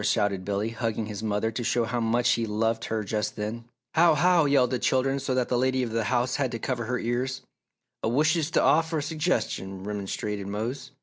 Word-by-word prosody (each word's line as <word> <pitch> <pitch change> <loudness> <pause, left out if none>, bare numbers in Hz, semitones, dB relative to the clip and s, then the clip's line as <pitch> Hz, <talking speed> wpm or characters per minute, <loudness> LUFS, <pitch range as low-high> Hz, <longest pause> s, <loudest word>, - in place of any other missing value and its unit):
shouted 100 -4 +1
Billy, 100 +3 -1
hugging 115 -1 -2
his 105 -1 -6
mother 110 +1 0
to 120 +2 -4
show 120 +1 +1
how 120 +1 -2
much 115 +1 +2
he 115 -1 +1
loved 115 +2 0
her 110 -1 -2
just 105 +1 -2
then. 110 +2 -4 0.3
"How! 165 -1 +5
How!" 175 +1 +4
yelled 135 -3 +3
the 125 - 0
children 135 +1 +1
so 135 -1 -1
that 125 -1 +1
the 125 - +1
lady 130 0 +1
of 120 - -3
the 115 -1 0
house 125 +2 +1
had 135 -4 0
to - - -1
cover 120 0 -2
her 125 +3 -1
ears. 125 +2 -2 0.6
"Ah - - -1
wishes 150 +5 +2
t' - - +2
offer 160 +1 +3
a - - 0
sugges'ion!" 145 - -2
remonstrated 105 0 -4
Mose. 120 +6 -4
120 Hz, 210 wpm, -27 LUFS, 110-130 Hz, 0.6 s, How